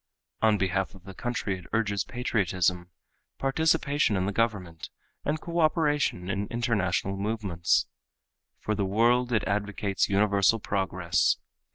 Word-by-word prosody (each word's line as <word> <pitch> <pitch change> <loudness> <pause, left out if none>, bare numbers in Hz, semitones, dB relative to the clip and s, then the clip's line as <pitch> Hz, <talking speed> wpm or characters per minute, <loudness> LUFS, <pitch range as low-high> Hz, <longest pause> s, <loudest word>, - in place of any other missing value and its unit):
On 110 -1 +4
behalf 95 0 -1
of 95 - -15
the 95 +1 -10
country 105 -4 -3
it 90 - -14
urges 105 -3 +1
patriotism, 95 -7 -1 0.5
participation 140 -4 +1
in 95 - 0
the 100 - -1
government, 95 -7 -2 0.3
and 155 +2 -1
cooperation 155 - +1
in 100 +1 -2
international 100 -5 0
movements. 100 -5 0 0.7
For 110 - -2
the 105 -1 -1
world 120 +5 +2
it 110 -3 +2
advocates 100 0 -1
universal 100 +1 +3
progress. 95 -4 +1
100 Hz, 125 wpm, -27 LUFS, 95-120 Hz, 0.7 s, On